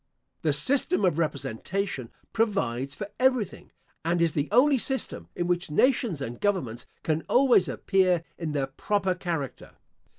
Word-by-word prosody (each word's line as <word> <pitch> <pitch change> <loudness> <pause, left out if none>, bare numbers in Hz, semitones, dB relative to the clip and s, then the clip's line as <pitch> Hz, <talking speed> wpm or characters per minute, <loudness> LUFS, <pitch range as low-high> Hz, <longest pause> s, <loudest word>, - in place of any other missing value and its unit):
The 155 - +2
system 255 - +2
of 170 -3 +1
representation 150 - -2 0.2
provides 140 - 0
for 205 -1 -6
everything, 255 -6 +1 0.3
and 170 +2 +1
is 165 -2 +2
the 145 -1 -1
only 265 +4 +5
system 265 +2 -2
in 175 - -1
which 175 -1 0
nations 225 - +2
and 120 -2 -5
governments 135 - -1 0.2
can 160 0 0
always 250 -7 +5
appear 185 -3 +2
in 165 -3 -4
their 140 -2 0
proper 190 +8 -1
character. 170 -7 -5
175 Hz, 140 wpm, -27 LUFS, 145-210 Hz, 0.3 s, only